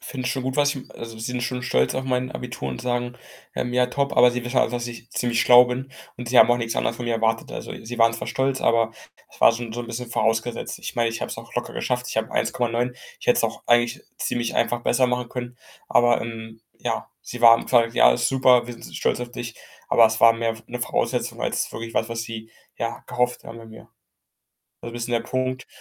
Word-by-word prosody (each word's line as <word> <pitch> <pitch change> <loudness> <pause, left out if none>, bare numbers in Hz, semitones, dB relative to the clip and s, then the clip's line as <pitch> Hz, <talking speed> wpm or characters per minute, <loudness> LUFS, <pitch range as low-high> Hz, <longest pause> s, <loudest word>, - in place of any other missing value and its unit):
finden 130 -2 -5
schon 130 +1 -1
gut, 130 +2 -3
was 145 0 +3
ich 130 - -9
also, 115 -1 -8
sind 125 +2 -3
schon 125 +1 -3
stolz 65 - +1
auf 130 - -1
mein 125 -1 -1
Abitur 120 - -5
und 65 - -5
sagen, 120 0 -2 0.4
ähm: 125 - -2
„Ja, 125 0 +3
top.“ 140 +3 -2
aber 125 0 +7
sie 125 0 -4
wissen 125 +1 0
einfach, 115 - +2
dass 120 -1 -2
ich 120 0 -10
ziemlich 120 -1 0
schlau 125 0 +8
bin 130 +2 -5 0.2
und 120 -1 -7
sie 125 - +4
haben - - +8
auch 120 - +4
nichts 115 -1 -3
anderes 115 - -1
von 120 - -6
mir 120 - 0
erwartet. 115 0 0
Also, - - -6
sie 120 +1 -6
waren 115 0 +5
zwar 115 - -5
stolz, 130 +2 0
aber 115 -1 +3 0.4
es - - -19
war - - +7
schon 115 -1 -5
so 120 - -4
'n 120 - -6
bisschen 120 0 -6
vorausgesetzt. 115 +1 -1
Ich - - -6
meine, 115 -1 +2
ich 115 - -5
habe - - -4
es - - -5
auch - - -11
locker - - -3
geschafft. 125 0 -2
Ich - - -5
habe 110 0 -1
1,9. 120 0 0 0.3
Ich - - -10
hätte - - +5
es - - +2
auch - - -3
eigentlich 120 0 +2
ziemlich 120 -1 -2
einfach 120 0 +1
besser 130 -1 +3
machen 125 -1 -1
können. 120 -1 -6 0.3
Aber, 120 0 +4
ähm, 110 -1 -7 0.2
ja, - - -3
sie 120 - -8
waren 115 -1 +7
quasi: 115 -2 +3
„Ja, - - +7
ist - - +1
super, 125 -2 +4
wir 120 - -6
sind 115 - -11
s - - -9
stolz - - 0
auf 120 0 -5
dich,“ 120 -1 -6 0.3
aber 115 - +6
es 110 +1 -2
war 115 0 +8
mehr 115 0 -1
'ne 125 0 -6
Voraussetzung - - -1
als - - -1
wirklich 115 0 -7
was, 115 - +1
was 115 0 -3
sie, 115 -1 -8 0.3
ja, 115 0 -4
gehofft 125 0 -1
haben 115 0 -9
bei 115 - -12
mir. 110 - -13 0.9
Also, 120 - -7
'n - - -11
bisschen 120 0 -4
der 115 - +2
Punkt. 130 0 -3
120 Hz, 245 wpm, -23 LUFS, 115-125 Hz, 0.9 s, schlau